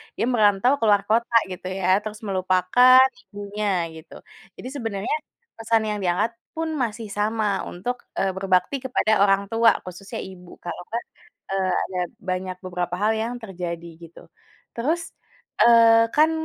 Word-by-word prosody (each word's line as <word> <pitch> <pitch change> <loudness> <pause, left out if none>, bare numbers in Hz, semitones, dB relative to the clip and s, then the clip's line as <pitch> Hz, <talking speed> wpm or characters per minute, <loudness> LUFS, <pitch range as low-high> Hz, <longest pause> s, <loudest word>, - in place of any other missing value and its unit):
dia - - 0
merantau 215 -1 +3
ke - - -4
luar 205 -1 +4
kota, 235 +2 +1 0.2
gitu, 185 0 -7
ya, 185 - -1
terus 215 0 -7
melupakan 190 +7 +5 0.2
ibunya, 205 +1 -5 0.3
gitu. 160 +1 -13 0.4
Jadi - - -9
sebenarnya 225 -3 -2 0.4
pesan 225 0 +1
yang 210 - -2
diangkat 180 +6 +1 0.2
pun 325 0 -2
masih 225 -1 -4
sama 215 +1 0 0.3
untuk, 220 +8 -4 0.2
eee, 195 0 +1
berbakti 190 +6 +1
kepada 250 -3 +1
orang 195 -1 +4
tua, 230 0 +5
khususnya 185 +2 -8
ibu. 180 -2 -13
Kalau 175 - -5
nggak, 235 +1 -3 0.5
eee, 190 -1 0
ada 185 -1 -4 0.3
banyak 185 0 -2
beberapa 180 -1 -3
hal 215 +1 +3
yang 230 +2 -2
terjadi, 175 -5 -6 0.2
gitu. 165 0 -13 0.5
Terus, 320 +8 -2 0.5
eee, 230 -1 +6
kan, 310 +1 +5
210 Hz, 145 wpm, -23 LUFS, 185-230 Hz, 0.5 s, eee